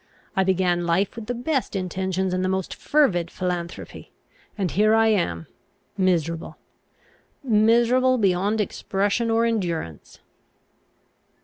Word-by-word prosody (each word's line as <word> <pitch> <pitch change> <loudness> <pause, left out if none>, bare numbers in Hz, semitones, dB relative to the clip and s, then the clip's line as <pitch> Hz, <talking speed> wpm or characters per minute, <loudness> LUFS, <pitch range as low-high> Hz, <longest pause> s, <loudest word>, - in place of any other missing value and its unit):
I 190 - +3
began 180 -2 +1
life 180 +4 +1
with 230 -2 -8
the 245 - -2
best 260 -1 -2
intentions 190 0 -2
and 185 0 0
the 185 - 0
most 190 -1 -2
fervid 190 - +1
philanthropy; 180 -2 -5 0.5
and 190 -4 -1
here 215 +2 +3
I 225 0 +4
am 85 - 0 0.5
miserable 170 -4 -1 0.9
miserable 240 +2 +3
beyond 200 +1 +1
expression 205 +2 -1
or 225 +1 +2
endurance." 175 - -3
190 Hz, 115 wpm, -23 LUFS, 180-225 Hz, 0.9 s, I